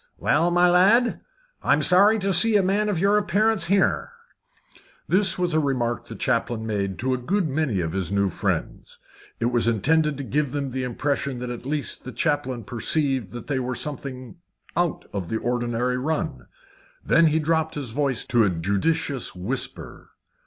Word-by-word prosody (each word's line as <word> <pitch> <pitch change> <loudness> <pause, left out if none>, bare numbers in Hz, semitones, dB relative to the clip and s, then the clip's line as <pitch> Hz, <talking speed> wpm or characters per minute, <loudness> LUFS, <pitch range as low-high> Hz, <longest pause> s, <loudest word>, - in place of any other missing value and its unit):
"Well, 165 +4 +2
my 175 +1 +4
lad, 200 +7 +4 0.4
I'm - - +2
sorry 200 +5 +5
to 195 -2 0
see 225 +5 +6
a 200 - +4
man 205 +3 +1
of 200 - -1
your 200 +4 +3
appearance 210 0 +1
here." 195 - +1 1.0
This 190 +1 +3
was 180 -2 -1
a 155 - +3
remark 125 -5 -1
the - - -8
chaplain 115 -2 -1
made 100 -3 -2
to 130 +2 -1
a 130 - -2
good 180 +8 0
many 135 -9 -1
of 80 -1 -3
his 95 -3 -1
new 100 0 +2
friends. - - -3 0.4
It 120 +1 0
was 120 -2 +1
intended 150 +7 +2
to 140 - -5
give 145 0 -1
them 140 -2 -3
the 130 +1 -3
impression 135 +1 -2
that 125 0 -5
at 120 +1 -7
least 150 -1 -3
the 130 - -7
chaplain 130 -6 -1
perceived 130 - 0
that 120 - -7
they 135 -2 -1
were 125 0 -3
something 135 -1 -6 0.4
out 175 -1 -1
of 95 -4 -4
the 110 - -1
ordinary 120 +1 -1
run. 130 - -3 0.6
Then 165 0 +4
he 155 0 +2
dropped 160 0 0
his 140 -6 -4
voice 135 -2 -1
to 120 -3 +3
a 105 - +3
judicious 100 - -1
whisper. 110 +9 -5
140 Hz, 175 wpm, -24 LUFS, 120-165 Hz, 1.0 s, see